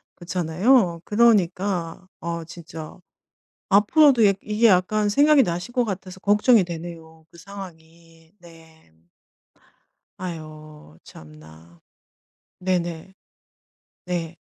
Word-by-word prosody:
그렇잖아요. 175 +2 +1
그러니까 190 -5 +1
어 170 0 -5
진짜 165 -2 -10 0.7
앞으로도 230 +4 +5
약 195 - +2
이게 215 +2 +2
약간 205 +2 +2
생각이 285 +4 +4
나실 175 +6 -4
것 245 - +1
같아서 190 -3 -6
걱정이 210 +1 +4
되네요, 165 -2 -9
그 170 - -17
상황이. 165 -3 -13
네. 160 - -19 1.3
아유 155 - -10
참나. 80 +2 -16 0.8
네네. 180 -1 -3 0.9
네. 170 -2 -4
175 Hz, 200 characters per minute, -23 LUFS, 160-200 Hz, 1.3 s, 앞으로도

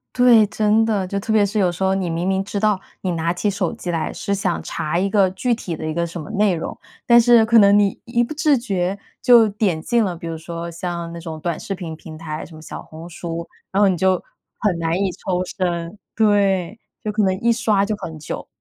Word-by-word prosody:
对， 240 -4 +6
真 215 +2 +2
的， 210 -4 0
就 200 +2 -3
特 220 +2 -2
别 210 -2 +4
是 205 +2 -1
有 185 -3 +3
时 175 +2 -4
候 190 0 +3
你 190 -2 -1
明 165 +1 -2
明 190 0 +1
知 200 +1 -5
道， 210 -1 +2 0.2
你 185 - -1
拿 165 0 0
起 190 +4 -1
手 195 -3 -1
机 175 - -5
来 165 -2 -2
是 200 - -3
想 190 -3 -1
查 160 0 -2
一 195 +3 +1
个 195 -2 +3
具 240 +6 0
体 190 -7 -4
的 155 - -6
一 155 - -2
个 170 +1 -1
什 170 0 -7
么 150 - -9
内 210 -2 +2
容， 160 - -5 0.3
但 235 0 +7
是 235 -1 +6
可 230 +1 +4
能 200 0 +6
你 200 -2 +2
一 235 0 +1
不 240 - -5
自觉 235 - +1 0.2
就 235 -4 +6
点 200 -6 0
进 235 +7 +1
了， 180 -3 -3
比 170 - -9
如 165 -1 -4
说 170 +1 -6
像 170 0 -5
那 170 - -7
种 160 -2 -6
短 170 +1 -2
视 195 - -4
频 175 -3 -6
平 155 0 -10
台， 155 -1 -6
什 165 - -13
么 155 - -12
小 155 - -8
红 160 +2 -11
书， 170 0 -5 0.3
然 195 - +3
后 200 - +5
你 185 - 0
就 185 +1 +2 0.4
很 190 -6 0
难 165 +1 0
以 195 -1 0
抽 180 0 -2
身， 180 -1 -3 0.2
对， 200 -2 +2 0.2
就 215 - -2
可 210 +1 0
能 190 -2 +2
一 235 - +3
刷 225 -4 +2
就 210 +2 -1
很 160 -5 -7
久。 155 - -6
190 Hz, 265 characters per minute, -21 LUFS, 170-210 Hz, 0.4 s, 但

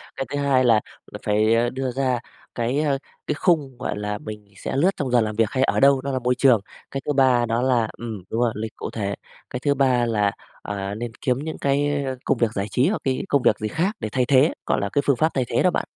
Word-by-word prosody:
cái 135 - -3
thứ 145 - -3
2 135 -2 +3
là 115 -3 +4 0.3
là - - -7
phải, 105 +1 +3
ơ, 120 +1 +2
đưa 130 0 -3
ra 130 -1 0 0.4
cái, 120 +4 0
ơ, 145 -3 +1 0.3
cái 150 - 0
khung 145 -7 +1
gọi 105 - -3
là 105 0 -3
mình 105 -1 -8
sẽ - - -4
lướt 170 +8 +3
trong 135 -4 -2
giờ 120 -2 +5
làm 105 -1 -2
việc 115 -1 +2
hay 130 0 +1
ở - - +1
đâu, 140 -1 +5
đó 140 +1 -3
là 130 - -1
môi 125 0 +1
trường. 125 -5 +4 0.3
Cái 135 - -3
thứ 150 - 0
3 130 -3 +4
đó 115 +2 0
là 125 -4 +2
ừm, 110 -6 -6
đúng 115 - -1
rồi, 120 -2 +2
lịch 110 0 -5
cụ - - -5
thể. 100 -2 -3 0.3
Cái 125 - -4
thứ 140 +1 +2
3 130 -3 +2
là, 105 -3 +1 0.3
à, 100 0 -4
nên 120 +1 -5
kiếm 125 -1 +1
những 160 0 -5
cái, 145 +1 +1
ơ, 130 -1 -3
công 135 - +2
việc 115 -2 +1
giải 100 -1 -2
trí 130 - +3
hoặc 215 - -2
cái 130 -1 -1
công 140 - +3
việc - - +3
gì 110 - -2
khác 180 - -1
để 110 - -3
thay 125 -1 +1
thế, 135 +4 +4
gọi - - +1
là, - - -1
cái 145 - +1
phương 140 - +3
pháp 155 +6 +2
thay 130 -2 0
thế - - +1
đó - - +4
bạn. - - -2
125 Hz, 270 wpm, -23 LUFS, 110-140 Hz, 0.4 s, giờ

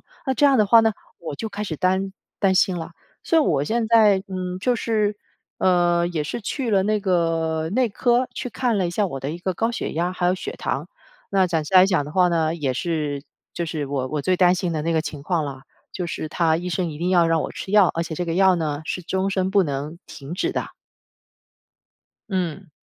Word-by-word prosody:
风。 - - -32 0.3
那 265 - +2
这 290 - +4
样 275 -2 +5
的 215 - +4
话 230 +3 +7
呢， 225 0 +2 0.3
我 165 -3 -6
就 220 - -5
开 210 0 -5
始 175 - -4
担， 190 +3 0 0.3
担 195 -2 +3
心 185 -1 +3
了。 165 +1 -7 0.3
所 330 - +2
以 320 - +6
我 145 - +1
现 225 +6 -1
在， 215 -4 +5
嗯， 185 -1 -4
就 245 +3 +1
是， 215 -3 0 0.4
呃， 175 -1 +3
也 170 -3 -2
是 150 - -4
去 245 +3 -3
了 195 -2 +3
那 210 +1 +1
个 165 -4 0
内 245 +4 +2
科 240 +4 +1
去 - - -4
看 230 +1 0
了 185 - +1
一 - - -3
下 205 +4 0
我 135 - -5
的 135 +3 -4
一 170 - -6
个 185 +1 -1
高 225 +6 -1
血 230 - -3
压， 175 +3 0
还 180 -1 -1
有 180 - +3
血 - - -5
糖， - - -3 0.4
那 190 -2 +3
暂 165 -3 0
时 150 - -6
来 185 0 +8
讲 180 -7 +1
的 150 - -9
话 180 0 +4
呢， 165 -2 +1
也 145 -6 -1
是 150 -1 -2 0.3
就 170 - -3
是 155 -2 -3
我 135 -2 -2
我 150 +2 -3
最 185 +3 +2
担 180 0 +5
心 180 -2 -2
的 155 -2 -2
那 165 +2 0
个 160 -1 +1
情 145 -3 -7
况 170 -3 0
了， 135 -2 -7 0.3
就 180 -2 -3
是 155 - -4
他 160 0 +2
医 180 +2 -4
生 175 +1 -1
一 150 -2 -7
定 175 +2 -1
要 175 -2 +4
让 165 -1 +2
我 - - -4
吃 190 - -7
药， 205 -4 +6
而 165 - 0
且 165 - -5
这 175 - -2
个 165 - -1
药 190 0 +5
呢， 155 -3 -2
是 180 - -4
终 190 +3 -1
身 190 -1 0
不 195 -1 +4
能 145 +2 -4
停 140 +2 -9
止 185 - -1
的。 - - -2 1.6
嗯。 185 -2 -3
180 Hz, 255 characters per minute, -23 LUFS, 160-195 Hz, 1.6 s, 来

